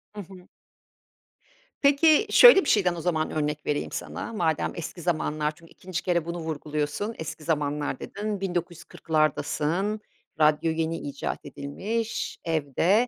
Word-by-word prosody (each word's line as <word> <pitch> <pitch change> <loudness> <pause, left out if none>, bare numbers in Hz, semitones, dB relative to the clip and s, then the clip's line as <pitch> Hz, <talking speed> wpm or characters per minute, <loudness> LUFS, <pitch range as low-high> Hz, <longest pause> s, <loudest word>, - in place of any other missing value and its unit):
Hı 205 - -5
hı. 185 -1 -13 1.3
Peki, 300 +6 +5
şöyle 485 -5 +9
bir - - 0
şeyden 180 -5 +3
o 170 - -5
zaman 160 -2 0
örnek 150 -1 -2
vereyim 145 0 -1
sana, 230 - -5
madem 160 -7 0
eski 170 +1 -6
zamanlar 155 -3 0
çünkü 165 +1 -18
2'nci 180 -2 -5
kere 170 -3 +1
bunu 170 +1 -4
vurguluyorsun. 155 +5 -3
Eski 160 0 -6
zamanlar 145 -3 -1
dedin, 205 -1 -4
1940'dasın 170 +1 -1 0.4
radyo 155 +1 +3
yeni 165 +1 -1
icat 140 -2 -5
edilmiş 210 +12 -4
evde. 165 - +2
165 Hz, 130 wpm, -26 LUFS, 150-195 Hz, 1.3 s, şöyle